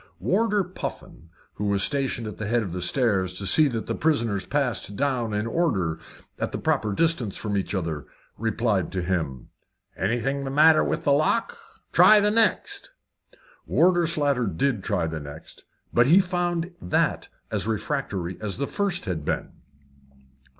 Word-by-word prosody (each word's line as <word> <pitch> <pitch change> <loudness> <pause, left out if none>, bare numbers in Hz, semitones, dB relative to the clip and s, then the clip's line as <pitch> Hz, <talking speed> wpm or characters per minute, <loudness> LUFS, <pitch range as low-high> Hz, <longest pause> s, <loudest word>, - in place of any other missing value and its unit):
Warder 210 +1 +1
Puffin, 175 - -8 0.2
who 105 - -3
was 100 -1 +2
stationed 135 -4 -1
at 105 - -7
the 110 - -3
head 115 +1 +1
of 95 - -5
the 90 +1 -4
stairs 95 -4 0
to 100 - -1
see 150 +11 +5
that 115 -5 -3
the - - -2
prisoners 115 -11 0
passed 130 -7 -1
down 130 -4 0
in 105 +1 -1
order, 115 - 0 0.4
at - - -2
the - - -3
proper 105 - 0
distance 125 - +1
from 105 -2 -3
each 100 +1 -2
other, 80 -6 -3 0.3
replied 110 -4 0
to 90 -2 -2
him. 80 -8 -3 0.5
"Anything 120 +8 -1
the 135 - -4
matter 155 +3 +5
with - - -2
the 145 - +2
lock? 155 +11 +1 0.4
Try 215 - +7
the 205 0 +2
next." 220 -3 +1 0.8
Warder 175 +3 +3
Slater 145 -7 +1
did 100 +5 -1
try 95 -5 0
the 80 0 -4
next, 70 +2 -11 0.3
but 120 +1 +4
he 170 +7 +7
found 175 -2 -1
that 90 - 0 0.2
as 105 -1 -1
refractory 95 -4 -3
as 105 -3 -4
the 140 - -1
first 195 +2 -2
had 85 -5 -3
been. - - -2
115 Hz, 165 wpm, -25 LUFS, 95-155 Hz, 0.8 s, Try